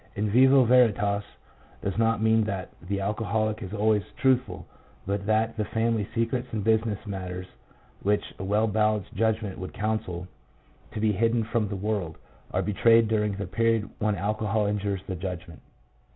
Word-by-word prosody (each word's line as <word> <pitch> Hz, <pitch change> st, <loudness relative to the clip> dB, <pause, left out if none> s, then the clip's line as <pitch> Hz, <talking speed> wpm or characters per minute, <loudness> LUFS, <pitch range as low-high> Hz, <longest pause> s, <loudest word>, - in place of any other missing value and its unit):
"In 105 Hz, 0 st, -1 dB
vino 130 Hz, +3 st, +6 dB
Veritas" 105 Hz, -5 st, +3 dB, 0.6 s
does 100 Hz, -, -2 dB
not 115 Hz, -1 st, +1 dB
mean 110 Hz, 0 st, +4 dB
that 100 Hz, -3 st, -4 dB
the 100 Hz, +3 st, -3 dB
alcoholic 110 Hz, +2 st, -1 dB
is 95 Hz, -3 st, -6 dB
always 105 Hz, 0 st, +2 dB, 0.2 s
truthful, 125 Hz, -8 st, +1 dB, 0.4 s
but 100 Hz, +1 st, -2 dB
that 110 Hz, +1 st, +1 dB
the 105 Hz, -, 0 dB
family 110 Hz, -2 st, 0 dB
secrets 120 Hz, +2 st, 0 dB
and 110 Hz, -2 st, -2 dB
business 110 Hz, -1 st, +2 dB
matters 95 Hz, -2 st, -5 dB, 0.6 s
which 105 Hz, +1 st, 0 dB
a -, -, -4 dB
well 105 Hz, +3 st, +2 dB
balanced 105 Hz, -2 st, 0 dB
judgment 110 Hz, -1 st, -1 dB
would 95 Hz, -, -6 dB
counsel 100 Hz, -4 st, -3 dB, 0.7 s
to -, -, -4 dB
be 110 Hz, 0 st, +2 dB
hidden 115 Hz, +3 st, +1 dB
from 110 Hz, -1 st, -1 dB
the 100 Hz, -, -4 dB
world, 100 Hz, -5 st, -2 dB, 0.3 s
are -, -, -1 dB
betrayed 115 Hz, +2 st, +4 dB
during 105 Hz, -2 st, +1 dB
the 100 Hz, +1 st, -4 dB
period 115 Hz, +2 st, 0 dB
when 105 Hz, -1 st, +1 dB
alcohol 105 Hz, +1 st, 0 dB
injures 100 Hz, -2 st, -1 dB
the 95 Hz, -, -4 dB
judgment. 90 Hz, -2 st, -6 dB
105 Hz, 160 wpm, -26 LUFS, 100-110 Hz, 0.7 s, vino